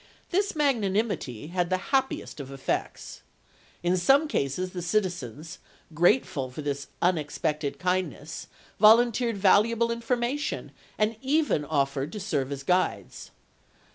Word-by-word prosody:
This 395 Hz, +1 st, +1 dB
magnanimity 205 Hz, -, 0 dB
had 175 Hz, -1 st, -1 dB
the 185 Hz, -, +2 dB, 0.2 s
happiest 265 Hz, -, 0 dB
effect. 135 Hz, -1 st, -4 dB, 0.6 s
In 175 Hz, +1 st, +2 dB
some 270 Hz, -, +4 dB
cases 180 Hz, -, -1 dB
the 180 Hz, -, -5 dB
citizens, 175 Hz, -, -2 dB, 0.3 s
grateful 165 Hz, -, +2 dB
for 135 Hz, +4 st, -7 dB
this 140 Hz, -1 st, -3 dB, 0.2 s
unexpected 150 Hz, -3 st, 0 dB
kindness, 180 Hz, -4 st, -2 dB, 0.3 s
volunteered 230 Hz, +1 st, +5 dB
valuable 220 Hz, +4 st, +4 dB
informa 240 Hz, +3 st, -1 dB
tion 295 Hz, -, -4 dB, 0.3 s
and 215 Hz, +1 st, +1 dB
even 285 Hz, -, +1 dB
offered 140 Hz, -1 st, -1 dB
to 210 Hz, -, -5 dB
serve 140 Hz, -9 st, -2 dB
as 140 Hz, -1 st, -5 dB
guides. 180 Hz, +4 st, -1 dB
185 Hz, 115 wpm, -27 LUFS, 150-230 Hz, 0.6 s, volunteered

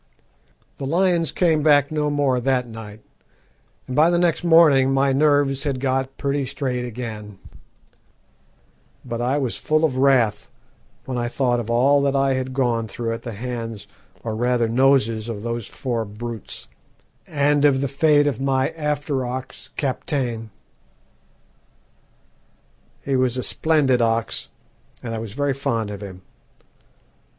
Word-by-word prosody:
"The 135 Hz, -, -4 dB
lions 170 Hz, -1 st, +2 dB
came 160 Hz, -4 st, +2 dB
back 145 Hz, -1 st, +4 dB
no 150 Hz, -1 st, 0 dB
more 140 Hz, -3 st, +1 dB
that 125 Hz, 0 st, 0 dB
night, 110 Hz, -2 st, -10 dB, 0.8 s
and 130 Hz, -, -5 dB
by 155 Hz, +3 st, +5 dB
the 175 Hz, -, +2 dB
next 175 Hz, 0 st, +1 dB
morning 155 Hz, -6 st, +5 dB
my 135 Hz, 0 st, +2 dB
nerves 145 Hz, -1 st, +2 dB
had 140 Hz, -4 st, -2 dB
got 135 Hz, 0 st, -1 dB
pretty 140 Hz, 0 st, -1 dB
straight 125 Hz, -2 st, -3 dB
again; 110 Hz, -4 st, -7 dB, 1.7 s
but 120 Hz, -1 st, -4 dB
I 130 Hz, +4 st, +1 dB
was 130 Hz, -5 st, -1 dB
full 155 Hz, +1 st, +1 dB
of 130 Hz, -5 st, -1 dB
wrath 130 Hz, -6 st, +2 dB, 0.6 s
when 125 Hz, -2 st, -3 dB
I 120 Hz, -, -1 dB
thought 120 Hz, -1 st, 0 dB
of 115 Hz, -1 st, -5 dB
all 135 Hz, +5 st, +4 dB
that 140 Hz, 0 st, +1 dB
I 135 Hz, 0 st, +2 dB
had 130 Hz, 0 st, -2 dB
gone 120 Hz, -4 st, 0 dB
through 115 Hz, +2 st, -3 dB
at 115 Hz, -, -6 dB
the 120 Hz, -, -6 dB
hands, 115 Hz, -2 st, -5 dB, 0.4 s
or 110 Hz, -2 st, -3 dB
rather 120 Hz, 0 st, +1 dB
noses, 115 Hz, -2 st, +2 dB
of 105 Hz, -2 st, -5 dB
those 115 Hz, -2 st, -3 dB
four 120 Hz, -4 st, -3 dB
brutes, 110 Hz, +1 st, -7 dB, 0.6 s
and 145 Hz, -1 st, +2 dB
of 140 Hz, -2 st, +4 dB
the 140 Hz, -, 0 dB
fate 145 Hz, +2 st, +3 dB
of 135 Hz, -4 st, -1 dB
my 135 Hz, -1 st, +1 dB
after 150 Hz, -3 st, -2 dB
ox 125 Hz, +1 st, -6 dB
Kaptein. 130 Hz, -5 st, -2 dB, 2.5 s
He 140 Hz, -, -1 dB
was 130 Hz, -1 st, +1 dB
a 125 Hz, -, -2 dB
splendid 145 Hz, -6 st, +2 dB
ox, 115 Hz, 0 st, 0 dB, 0.5 s
and 115 Hz, -2 st, -4 dB
I 115 Hz, -, -3 dB
was 110 Hz, -2 st, -6 dB
very 145 Hz, +2 st, 0 dB
fond 115 Hz, -6 st, -2 dB
of 100 Hz, 0 st, -7 dB
him. 95 Hz, -2 st, -9 dB
130 Hz, 145 wpm, -22 LUFS, 115-145 Hz, 2.5 s, by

